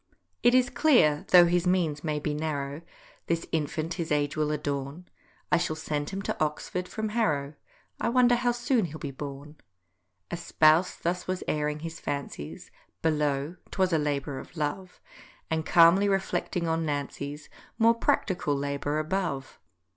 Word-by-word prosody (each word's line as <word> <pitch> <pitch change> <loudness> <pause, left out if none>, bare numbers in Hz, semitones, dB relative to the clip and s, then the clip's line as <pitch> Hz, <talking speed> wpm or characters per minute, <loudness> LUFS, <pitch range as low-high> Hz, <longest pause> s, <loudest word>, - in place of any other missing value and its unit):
It 240 +1 +5
is 255 -1 +3
clear, 240 - +4
though 180 -1 +8
his 175 +1 +1
means 165 -5 +1
may 155 -2 -1
be 150 0 -2
narrow, 145 -1 -3 0.5
This 170 0 0
infant 160 +1 -1
his 165 -2 -4
age 145 -1 +1
will 155 -1 0
adorn; 145 +3 -3 0.4
I - - +5
shall 170 -2 -1
send 150 -2 -3
him 195 0 -5
to - - -1
Oxford 165 +4 -3
from 220 +2 -3
Harrow— 155 -11 0 0.5
I - - 0
wonder 245 0 +4
how 245 0 +2
soon 240 -2 +1
he'll 155 -2 -7
be 145 -3 -5
born. 145 +2 -8 0.7
A 175 - -2
spouse 160 +1 +3
thus 180 +1 -3
was 185 0 -2
airing 150 0 -1
his 165 0 -6
fancies 80 - -5 0.3
Below—'twas 155 +4 0
a 160 - +3
labour 145 -2 -2
of - - -12
love— 170 +5 -3 0.5
And 160 -1 -1
calmly 175 +4 +6
reflecting 180 -3 -1
on 165 0 0
Nancy's 145 0 -4 0.3
More 230 +1 +5
practical 185 -9 0
labour 140 +1 -2
above. 155 -4 -2
160 Hz, 155 wpm, -28 LUFS, 145-180 Hz, 0.7 s, though